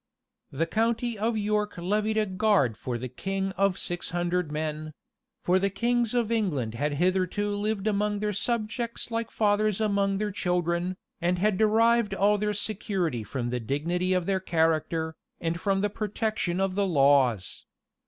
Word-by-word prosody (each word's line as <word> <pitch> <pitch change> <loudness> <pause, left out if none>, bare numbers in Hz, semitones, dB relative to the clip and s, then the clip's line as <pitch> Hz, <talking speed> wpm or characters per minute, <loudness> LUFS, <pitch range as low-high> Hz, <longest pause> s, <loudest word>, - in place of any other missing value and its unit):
The 160 +3 -1
county 230 +5 0
of 220 +2 0
York 210 -1 -1
levied 210 +5 0
a 215 - +3
guard 190 - +2
for 120 +2 -4
the 125 +2 -5
king 195 +9 -3
of 195 -1 +1
six 175 -1 -3
hundred 175 -2 -1
men; 155 0 -3 0.5
for 185 +1 +3
the 200 +1 +1
kings 235 +3 0
of 235 -2 +1
England 155 - 0
had 145 +5 -1
hitherto 185 +4 +1
lived 205 0 -2
among 210 -1 +1
their 210 0 -1
subjects 235 +2 -2
like 230 0 -2
fathers 210 -1 +1
among 200 -2 +1
their 210 0 -1
children, 180 -1 -1 0.2
and 175 +1 +1
had 205 +2 +2
derived 220 -1 +3
all 205 +2 +3
their 210 0 0
security 195 - -1
from 120 +2 -3
the 125 - -1
dignity 170 +10 -1
of 180 -2 +1
their 195 0 +1
character, 160 -2 0 0.3
and 165 0 -2
from 195 -1 +1
the 205 - +2
protection 210 -4 -2
of 195 -1 +1
the 200 +1 +1
laws. 135 - +2
195 Hz, 165 wpm, -27 LUFS, 170-210 Hz, 0.5 s, a